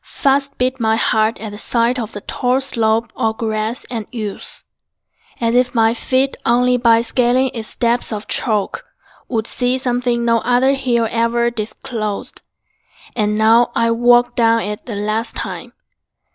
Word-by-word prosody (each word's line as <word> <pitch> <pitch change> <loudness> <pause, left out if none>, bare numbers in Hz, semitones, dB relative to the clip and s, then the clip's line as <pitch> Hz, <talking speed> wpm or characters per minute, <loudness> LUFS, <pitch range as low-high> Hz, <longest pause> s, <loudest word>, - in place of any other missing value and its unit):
Fast 275 0 0
beat 255 +1 0
My 220 -1 +2
heart 220 0 +1
at 215 -1 -6
the 205 - -8
sight 235 +2 0
of 225 -2 -4
the 205 - -7
tall 250 +4 0
slope 230 -3 +1
Or 220 0 0
grass 220 +2 -3
and 225 -4 -4
yews, 215 -5 -5 0.8
as 230 -1 0
if 245 0 +2
my 225 0 +3
feet 260 +3 +1
Only 250 +1 +3
by 230 -2 +4
scaling 250 +2 +1
its 225 -2 -5
steps 240 0 -1
of 215 -1 -5
chalk 210 -5 -1 0.4
Would 225 -3 -2
see 250 +2 0
something 245 -2 -1
no 230 0 +3
other 250 +3 +2
hill 245 -4 0
Ever 235 +1 +1
disclosed. 215 -1 -5 0.7
And 210 -2 0
now 225 +2 +4
I 230 0 +2
walk 240 +1 +3
Down 230 -1 +3
it 210 +3 -5
the 225 - -4
last 215 +3 -2
time. - - -5
235 Hz, 160 wpm, -18 LUFS, 220-245 Hz, 0.8 s, by